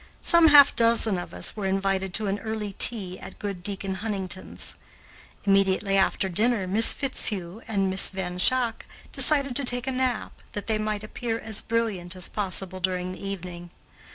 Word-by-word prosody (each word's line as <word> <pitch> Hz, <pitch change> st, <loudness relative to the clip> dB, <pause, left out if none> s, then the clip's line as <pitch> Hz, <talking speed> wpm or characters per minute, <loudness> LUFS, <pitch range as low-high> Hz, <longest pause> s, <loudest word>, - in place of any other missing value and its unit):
Some 340 Hz, -1 st, +5 dB
half 290 Hz, -2 st, +7 dB
dozen 230 Hz, -4 st, +4 dB
of 175 Hz, -, -8 dB
us 90 Hz, 0 st, -2 dB
were 205 Hz, -3 st, -3 dB
invited 195 Hz, 0 st, -1 dB
to 220 Hz, -, +2 dB
an 200 Hz, +1 st, -2 dB
early 215 Hz, -2 st, -5 dB
tea 190 Hz, -6 st, +4 dB
at -, -, -11 dB
good 200 Hz, -3 st, -6 dB
Deacon 195 Hz, 0 st, -2 dB
Huntington's. 190 Hz, -4 st, -4 dB, 0.7 s
Immediately 195 Hz, 0 st, +1 dB
after 190 Hz, 0 st, +1 dB
dinner, 210 Hz, +2 st, 0 dB
Miss 210 Hz, +5 st, +5 dB
Fitzhugh 210 Hz, -8 st, -2 dB
and 200 Hz, -3 st, 0 dB
Miss 190 Hz, 0 st, +5 dB
Van 180 Hz, -2 st, -5 dB
Schaack 240 Hz, +3 st, +1 dB, 0.2 s
decided 280 Hz, -4 st, +2 dB
to 280 Hz, -, -1 dB
take 245 Hz, -1 st, +2 dB
a 265 Hz, -, -2 dB
nap, 255 Hz, -3 st, -2 dB, 0.2 s
that 205 Hz, -, -6 dB
they 220 Hz, -1 st, -1 dB
might 215 Hz, -1 st, -3 dB
appear 225 Hz, +1 st, -4 dB
as 220 Hz, -2 st, -1 dB
brilliant 210 Hz, -6 st, -2 dB
as 180 Hz, -1 st, -5 dB
possible 190 Hz, -2 st, -3 dB
during 185 Hz, 0 st, -2 dB
the 185 Hz, -, -10 dB
evening. 180 Hz, -3 st, -7 dB
200 Hz, 170 wpm, -25 LUFS, 190-230 Hz, 0.7 s, half